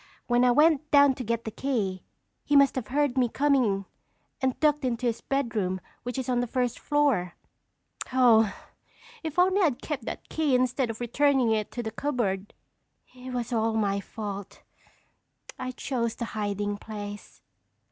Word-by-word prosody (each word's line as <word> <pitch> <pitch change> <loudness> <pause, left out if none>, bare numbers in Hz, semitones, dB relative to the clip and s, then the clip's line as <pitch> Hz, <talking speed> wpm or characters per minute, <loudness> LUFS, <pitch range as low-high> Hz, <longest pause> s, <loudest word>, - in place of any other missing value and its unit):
When 240 0 +3
I 250 - +5
went 300 +3 +4
down 285 -2 +6
to 255 - -6
get 230 0 -2
the 220 - -4
key, 210 -9 -2 0.4
he 290 - +1
must 280 -1 +6
have 250 -5 -4
heard 275 0 +1
me 245 -2 +2
coming 250 -9 +2 0.6
and 260 -1 0
ducked 295 -1 +2
into 250 -1 -1
his 235 -1 -1
bedroom 220 -9 -1 0.2
which 245 +2 -5
is 260 - -3
on 250 -1 +1
the 245 - 0
first 250 0 -1
floor. 275 - +1 0.8
Oh, 230 -5 +5 0.7
if 320 -1 -5
only 375 +3 +4
I'd 285 -8 +1
kept 280 -7 -4
that - - -6
key 305 -5 +1
instead 250 0 +1
of 225 +1 -6
returning 260 0 +2
it 215 -1 0
to 240 - -3
the 220 - -4
cupboard!" 220 -7 -2 0.6
"It 255 0 -9
was 245 -1 -3
all 225 0 +1
my 200 -2 +1
fault. 200 -1 -7 1.0
I 255 - -3
chose 245 -2 -2
the 235 - -4
hiding 205 -1 -2
place." 205 -1 -8
245 Hz, 165 wpm, -27 LUFS, 220-275 Hz, 1.0 s, down